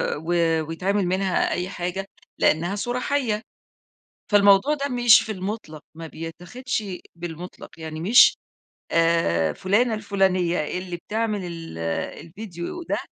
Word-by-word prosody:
و 160 +4 -3 0.3
ويتعمل 190 +4 0
منها 185 0 +1
أي 180 +1 -2
حاجة؛ 180 +1 -4 0.3
لأنها 170 +5 +2
صورة 245 +4 -2
حَيّة. 250 -6 0 0.9
فالموضوع 205 +7 +5
ده 280 -1 -3
مش 240 -3 +6
في 220 - -4
المطلق، 190 -5 -5
ما 165 0 -8
بيتاخدش 180 - -5 0.3
بالمطلق، 170 +1 -8
يعني 160 0 -6
مش، 220 +9 +6 0.6
آآ، 165 - +2
فلانة 220 +5 +1
الفلانية 185 -6 0
اللي 180 -1 -5
بتعمل 215 +1 -2
ال 165 - -7 0.5
الفيديو 185 - -7
ده - - -1
185 Hz, 120 wpm, -24 LUFS, 170-215 Hz, 0.9 s, مش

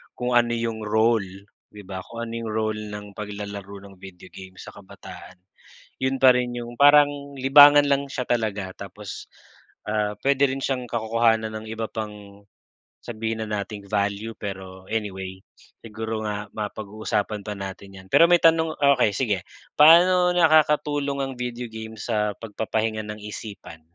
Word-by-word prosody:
kung 125 0 -3
ano 120 0 +3
yung 115 -1 -3
role 105 -3 0 0.3
di 105 - -10
ba 95 -1 -6
kung 115 0 -6
ano 115 - -7
yung 110 - -4
role 110 0 -2
ng 105 -1 -9
paglalaro 100 -1 -7
ng 100 -1 -14
video 95 -1 -12
game 95 -1 -12
sa - - -10
kabataan 95 -2 -13 0.6
yun 130 0 0
pa 130 -1 +7
rin 125 -1 -1
yung 120 0 -7
parang 145 0 +7 0.3
libangan 145 +2 +7
lang 140 0 +1
siya 125 -2 -3
talaga. 105 -5 -2
Tapos, 100 0 -9 0.6
ah, 105 -1 0
pwede 140 0 +3
rin 135 +1 -4
siyang 130 -2 -1
kakukuhanan 110 -1 +1
ng 110 0 -6
iba 110 0 -3
pang, 105 -2 -8 0.6
sabihin 110 -1 -4
na - - -9
nating 100 0 -8
value 105 +2 -1
pero 95 -2 -8
anyway, 95 -3 -4 0.5
siguro 110 0 -5
nga 105 0 -4
mapag-uusapan 105 0 -3
pa 105 - -5
natin 95 0 -8
yan 95 - -16
pero 170 - +7
may 175 -1 +5
tanong 165 -1 +4 0.2
okey 110 -5 +2
sige 105 -4 0 0.4
paano 180 +4 +6
nakakatulong 150 -4 +2
ang 135 0 -2
video 125 -1 -5
game 110 0 -8
sa 105 -3 -1
pagpapahinga 110 0 -3
ng 105 0 -8
isipan? 100 -6 -9
110 Hz, 155 wpm, -24 LUFS, 100-125 Hz, 0.6 s, pa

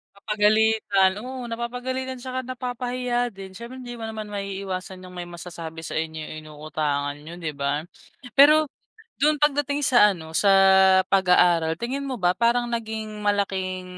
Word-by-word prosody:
Papagalitan, 210 -2 +2
oo, 255 0 -6
napapagalitan 250 +3 -4
at 245 - -12
saka 255 0 -3
napapahiya 250 -1 -2
din, 195 -2 -11
syempre 235 +5 -9
hindi 245 -1 -8
mo 225 -2 -6
naman 220 -1 -6
maiiwasan 195 -2 -5
yung 180 - -12
may 175 -1 -6
masasabi 165 -2 -8
sa - - -6
inyo 160 -1 -3 0.2
inuutangan 150 -2 -3
niyo, 165 +3 -10
'di 160 -3 -4
ba? 140 +3 -2 0.5
Pero 305 +3 +7 0.6
dun 300 +1 +4
pagdating 290 -1 +1
sa 210 -6 +6
ano 160 -1 -10
sa 200 +4 +2 0.6
pag-aaral 175 -4 +4
tingin 265 +6 -3
mo 260 - -3
ba 180 -4 +2
parang 235 +4 +2
naging 220 -2 -4
malaking 190 -3 -1
210 Hz, 145 wpm, -24 LUFS, 180-245 Hz, 0.6 s, Pero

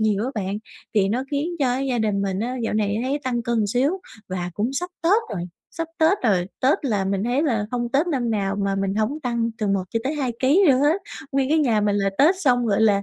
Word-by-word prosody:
nhiều 215 -1 +1
á 260 - -2
bạn 200 -1 -2 0.4
thì 195 -2 +3
nó 245 +6 -1
khiến 290 +3 -1
cho 255 -3 +1
gia 265 -3 -1
đình 210 -3 0
mình 195 -1 -1
á 250 +3 -2
dạo 225 - -1
này 210 -1 +1
thấy 270 +3 -1
tăng 240 -2 -1
cân 230 -3 0
xíu. 250 +7 +2 0.4
Và 180 -1 -3
cũng 220 +7 -1
sắp 355 +6 -3
Tết 385 +7 +4
rồi, 175 - -3 0.3
sắp 330 -1 -4
Tết 325 +5 +4
rồi, 185 -6 +2
Tết 275 +2 +2
là 210 -6 0
mình 195 +1 -1
thấy 250 +5 +1
là 225 -9 0
hông 240 -1 -1
Tết 290 +6 +3
năm 255 -8 0
nào 200 -2 -1
mà 200 -1 0
mình 195 0 -1
hổng 220 +9 -1
tăng 235 -3 -1
từ 215 - -1
1 195 -1 +1
cho 230 - -1
tới 280 +4 -1
2 265 -5 -1
ký 295 +10 +4
lận 260 -2 +5
hết. 310 +7 +2 0.3
Nguyên 270 -1 +1
cái 315 +2 +3
nhà 235 -8 +2
mình 205 -1 +1
là 195 -1 +1
Tết 320 +7 +6
xong, 245 -6 +3
gọi 205 -2 +2
là, 205 -2 +4
235 Hz, 255 wpm, -23 LUFS, 205-275 Hz, 0.4 s, Tết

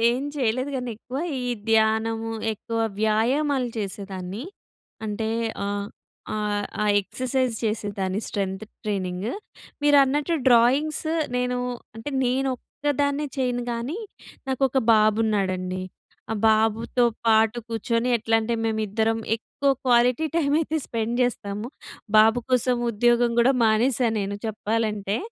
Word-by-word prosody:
ఏం 260 +3 -2
చెయ్యలేదు 255 +1 0
గానీ 250 -1 -3
ఎక్కువ, 250 +4 -6 0.2
ఈ - - -3 0.2
ధ్యానము, 225 +1 +2 0.2
ఎక్కువ 230 +2 -5 0.2
వ్యాయామాలు 250 +5 +2
చేసేదాన్ని. 195 0 -5 0.6
అంటే, 220 +1 -2 0.4
ఆహ్, 200 0 -2 0.5
ఆహ్, 210 -1 -1 0.2
ఆ - - +1 0.2
ఎక్ససైజ్ 255 +4 -1
చేసేదాన్ని 205 -3 -2
స్ట్రెంథ్ 195 0 -3 0.2
ట్రైనింగ్. 190 -1 -2 0.6
మీరన్నట్టు 290 +2 +4
డ్రాయింగ్స్ 265 +7 +3 0.3
నేనూ 250 0 0 0.4
అంటే, 225 +6 -5
నేనొక్కదాన్నే 280 +3 -1
చెయ్యను 245 -2 0
గానీ, 245 - -3 0.5
నాకొక 265 0 +1
బాబున్నాడండి. 205 -4 +1 0.5
ఆ - - 0
బాబుతో 225 +3 +2 0.2
పాటు 220 +1 +4
కూర్చొని 230 +2 0
ఎట్లంటే, 225 +1 +1
మేమిద్దరం 220 0 0 0.2
ఎక్కువ 275 +4 -1 0.2
క్వాలిటీ 245 +4 +4
టైమైతే 310 +1 +1
స్పెండ్ 230 +1 -2
జేస్తాము. 210 -2 -2 0.5
బాబు 225 +2 +6
కోసం 250 0 +3
ఉద్యోగం 240 +2 +3
గూడా 260 +3 +4
మానేశా 235 +3 +3
నేను 200 0 -3
చెప్పాలంటే. 215 -1 -1
225 Hz, 105 wpm, -24 LUFS, 215-255 Hz, 0.6 s, బాబు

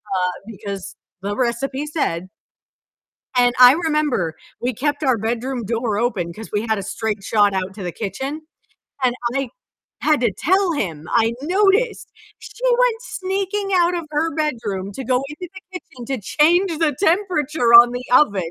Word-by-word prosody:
uh, 180 0 +1 0.2
because 200 -2 -7 0.3
the 200 +1 -3
recipe 260 +3 -1
said 185 - -2 1.1
and 245 0 +4
I 250 +1 +10
remember 300 - 0 0.3
we 250 +1 -1
kept 290 +5 -2
our 260 -4 +3
bedroom 240 +3 -2
door 225 -1 -1
open 185 -8 -1
'cause 220 +3 -9
we 205 0 0
had 220 -1 +1
a 195 - -4
straight 215 -1 -3
shot 205 -1 +3
out 190 0 -2
to 200 - -7
the 175 - -3
kitchen, 265 - -5 0.6
and 245 -1 +2 0.2
I 275 -2 -1 0.5
had 305 -4 +2
to 235 -5 +1
tell 375 +2 +2
him, 165 - -3
I 225 0 +3
noticed 395 +7 +1 0.3
she 420 +4 -13
went 485 -1 +2
sneaking 390 -1 -3
out 350 0 +3
of 335 -3 -4
her 315 +2 -1
bedroom 225 -11 -2
to 265 +5 -6
go 255 +2 +1
into 315 +4 -8
the 380 - -9 0.2
kitchen 245 -7 -13
to 265 -5 -3
change 330 - +2
the 310 -4 +1
temperature 320 - +1
on 240 +1 +10
the 245 0 -4
oven, 200 - +3
255 Hz, 165 wpm, -20 LUFS, 215-320 Hz, 1.1 s, I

